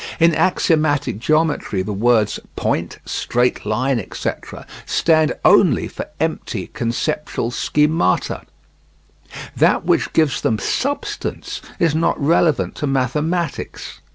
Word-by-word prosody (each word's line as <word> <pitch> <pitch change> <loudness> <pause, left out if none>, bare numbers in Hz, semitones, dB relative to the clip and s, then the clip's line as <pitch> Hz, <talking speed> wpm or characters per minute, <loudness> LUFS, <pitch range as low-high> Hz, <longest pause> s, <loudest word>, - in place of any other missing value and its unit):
In 165 0 +5
axiomatic 155 - +1
geometry 155 - +1
the 105 +2 -4
words 110 +1 +2 0.2
"point," - - -2
"straight 125 -3 -1
line," 125 +4 +1
etc., 105 - -6 0.2
stand 160 -2 +2
only - - +5
for - - -7
empty - - -3
conceptual 120 +1 -2
schemata. 150 - +1 1.1
That - - +3
which - - +1
gives 155 -5 +2
them 110 - +1
substance 285 - -3 0.2
is 165 -3 +2
not 160 +1 +1
relevant 160 +1 +2
to 145 - -2
mathematics. 150 +5 -2
150 Hz, 105 wpm, -19 LUFS, 120-160 Hz, 1.1 s, In